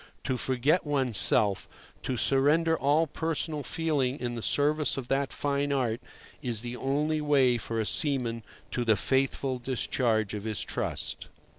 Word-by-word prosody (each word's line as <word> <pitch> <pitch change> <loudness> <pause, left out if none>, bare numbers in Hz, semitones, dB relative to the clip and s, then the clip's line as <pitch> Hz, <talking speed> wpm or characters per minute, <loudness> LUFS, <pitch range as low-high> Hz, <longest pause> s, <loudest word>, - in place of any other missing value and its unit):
To 130 - -1
forget 130 +7 +1
one's 130 -8 +1
self, 100 0 +2 0.3
to 130 - -2
surrender 150 +7 +3
all 150 +2 +2
personal 160 0 -2
feeling 145 -3 -1
in 120 -1 -3
the 115 - -5
service 150 +5 +2
of 130 -2 -5
that 135 0 0
fine 145 0 -1
art, 125 -3 0 0.4
is 120 -4 -3
the 120 0 -5
only 150 +4 0
way 135 -5 +3
for 115 0 -3
a 110 - 0
seaman 125 -4 -1 0.3
to 125 - -1
the 110 -2 +3
faithful 130 +2 0
discharge 120 -4 0
of 105 -1 -5
his 110 -2 -1
trust. - - -3
135 Hz, 155 wpm, -28 LUFS, 120-145 Hz, 0.4 s, surrender